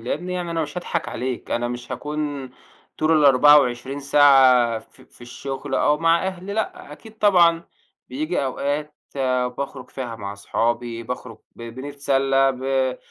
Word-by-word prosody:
لأنّي 160 Hz, +10 st, -4 dB
يعني 180 Hz, -1 st, -3 dB
أنا 165 Hz, -1 st, -1 dB
مش 150 Hz, +4 st, -5 dB
هاضحك 175 Hz, -, -3 dB
عليك، 125 Hz, -1 st, -5 dB
أنا 120 Hz, 0 st, -1 dB
مش 120 Hz, 0 st, -6 dB
هاكون 145 Hz, -3 st, -4 dB, 0.5 s
طول 155 Hz, 0 st, +3 dB
ال24 140 Hz, -2 st, +4 dB
ساعة 135 Hz, -5 st, +5 dB
في 110 Hz, -, -20 dB
في -, -, -23 dB
الشغل 135 Hz, +3 st, -6 dB
أو 150 Hz, 0 st, +2 dB
مع 165 Hz, +2 st, +2 dB
أهلي 190 Hz, +1 st, -5 dB
لأ، 215 Hz, -8 st, -4 dB
أكيد 220 Hz, +8 st, -14 dB
طبعًا 170 Hz, -5 st, +4 dB, 0.4 s
بييجي 155 Hz, +4 st, -2 dB
أوقات 145 Hz, +3 st, -3 dB, 0.6 s
باخرج 135 Hz, -2 st, -6 dB
فيها 120 Hz, -4 st, -6 dB
مع 100 Hz, -2 st, -6 dB
صحابي، 115 Hz, +3 st, -2 dB
باخرج 125 Hz, -1 st, -7 dB, 0.2 s
ب 115 Hz, -, -11 dB
بنتسلّى، 135 Hz, +2 st, 0 dB
ب 130 Hz, 0 st, -1 dB
135 Hz, 140 wpm, -22 LUFS, 125-150 Hz, 0.6 s, ساعة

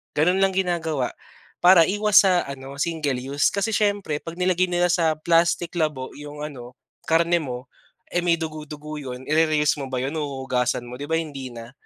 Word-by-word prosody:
Ganun 180 Hz, +6 st, +3 dB
lang 195 Hz, -, +3 dB
ginagawa 165 Hz, -8 st, 0 dB, 0.5 s
para 180 Hz, -2 st, +8 dB
iwas 210 Hz, +1 st, +5 dB
sa 185 Hz, -2 st, +3 dB
ano 135 Hz, 0 st, -8 dB
single 155 Hz, -3 st, -1 dB
use 140 Hz, +2 st, +1 dB
kasi 200 Hz, +2 st, 0 dB
siyempre 205 Hz, -8 st, 0 dB
'pag 165 Hz, -, -7 dB
nilagay 185 Hz, 0 st, +2 dB
nila 175 Hz, 0 st, +2 dB
sa 165 Hz, -3 st, +2 dB
plastic 170 Hz, +1 st, +2 dB
labo 150 Hz, -5 st, -1 dB
yung 150 Hz, 0 st, -8 dB
ano 125 Hz, -4 st, -9 dB, 0.3 s
karne 170 Hz, +1 st, +3 dB
mo, 125 Hz, -3 st, -6 dB, 0.4 s
eh, 175 Hz, -, +1 dB
may, 175 Hz, -1 st, +3 dB
dugo-dugo 155 Hz, -1 st, -6 dB
yun 125 Hz, -2 st, -7 dB
ire-reuse 155 Hz, -1 st, +2 dB
mo 135 Hz, -, -4 dB
ba 130 Hz, -1 st, -2 dB
yun 135 Hz, -, -2 dB
o -, -, -1 dB
huhuhugasan 130 Hz, -3 st, -1 dB
mo, 125 Hz, -, -7 dB
di 145 Hz, -, -5 dB
ba 160 Hz, -, +2 dB
hindi 140 Hz, -5 st, -6 dB
na. 115 Hz, +1 st, -9 dB
155 Hz, 180 wpm, -23 LUFS, 140-175 Hz, 0.5 s, para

